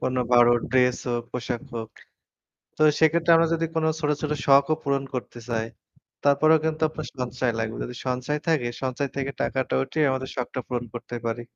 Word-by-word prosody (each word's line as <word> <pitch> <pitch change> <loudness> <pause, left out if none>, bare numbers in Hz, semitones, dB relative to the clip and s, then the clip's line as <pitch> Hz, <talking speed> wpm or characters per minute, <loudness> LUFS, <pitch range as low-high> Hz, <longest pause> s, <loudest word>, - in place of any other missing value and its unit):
কোনো 130 0 0
ভালো 120 0 +7 0.2
ড্রেস 125 -1 +3
হোক, 120 0 -1
পোশাক 125 -1 -3
হোক। 115 -1 -5 0.9
তো 155 - 0 0.2
সেক্ষেত্রে 165 +1 +3
আমরা 165 0 +3
যদি 165 0 0
কোনো 160 0 +2
ছোট, 150 -2 0
ছোট 150 -1 -1
শখও 140 +3 +5
পূরণ 140 -2 0
করতে 120 -1 -5
চাই 115 -2 -1 0.6
তারপরেও 155 +3 +5
কিন্তু 160 0 -1
আপনার 155 0 -7
সঞ্চয় 125 -1 -1
লাগবে। 110 0 -2
যদি 125 - -7
সঞ্চয় 130 +4 -1
থাকে 155 -7 +2 0.2
সঞ্চয় 130 +2 -1
থেকে 140 0 -1
টাকাটা 130 -1 -1
উঠিয়ে 150 +4 0
আমাদের 130 0 -2
শখটা 130 0 -3
পূরণ 125 -1 -2
করতে 120 0 -6
পারি। 115 +1 -2
130 Hz, 175 wpm, -25 LUFS, 125-155 Hz, 0.9 s, ভালো